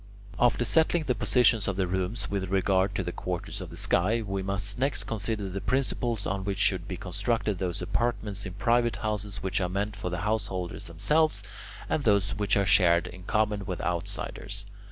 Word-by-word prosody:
After 120 0 +3
settling 160 +5 +3
the 130 - +1
positions 120 -5 +3
of 100 - 0
the 95 0 +1
rooms 95 +5 -2
with 95 -2 -2
regard 95 0 +2
to - - 0
the - - -3
quarters - - -4
of - - -7
the - - -10
sky, 110 +6 +2
we 100 -2 -2
must 100 +3 -3
next 135 +1 +1
consider 110 -1 -2
the 95 +1 -4
principles 120 -4 0
on 95 0 -2
which 100 0 -2
should - - +1
be - - -4
constructed 110 -5 -1
those 90 -2 -2
apartments 105 0 -1
in 95 - -6
private 115 +3 +2
houses 105 -3 -3
which 95 0 0
are 90 - 0
meant 100 +3 -2
for 100 -3 -4
the 90 -1 -3
householders 100 -4 -2
themselves, 150 - +2 0.4
and 150 - 0
those 100 -3 +3
which 105 +1 +1
are 100 - +2
to - - +2
be - - +8
shared 85 -4 +5
in 90 0 -9
common 105 -1 +1
with 90 - -3
outsiders. 90 +3 -3
100 Hz, 195 wpm, -28 LUFS, 95-115 Hz, 0.4 s, be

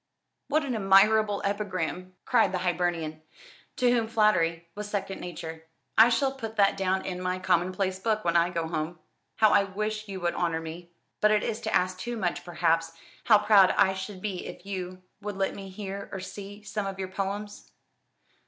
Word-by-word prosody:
"What 305 +1 +1
an 260 - -2
admirable 205 0 +4
epigram!" 185 -3 -3
cried 225 -6 +3
the - - +1
Hibernian, 170 -3 -1 0.5
to 250 -1 +3
whom 230 -2 +2
flattery 170 -7 +2
was 210 +1 -6
second 195 -2 -3
nature. 160 -2 -7 0.3
"I 225 +2 +8
shall 265 +3 +2
put 225 -5 -7
that 200 -2 +4
down 190 0 0
in 180 -1 -4
my 185 0 -1
commonplace 185 +1 0
book 215 0 -1
when 170 0 +1
I 170 +1 +4
go 165 -2 -2
home. 160 +1 -3 0.4
How 215 -1 +5
I 200 - +5
wish 215 +2 -3
you 195 -1 -5
would 175 0 0
honour 165 -2 0
me 165 +2 -8 0.3
but 210 - +4
it 215 -1 +3
is 220 - -3
to - - -1
ask 185 0 +1
too 240 +4 -4
much, 175 -3 -2
perhaps 165 -2 0 0.3
how 220 -3 +7
proud 205 -2 +5
I 190 - +5
should 190 0 -7
be 195 -4 -3
if - - -10
you 185 -2 -5 0.2
would 205 -1 -5
let 195 0 0
me 195 -1 -8
hear, 200 0 -6
or 195 - -4
see, 200 +2 -9
some 205 -1 -3
of 195 -1 -5
your 190 -1 -4
poems." 200 +2 -5
195 Hz, 190 wpm, -28 LUFS, 180-210 Hz, 0.5 s, I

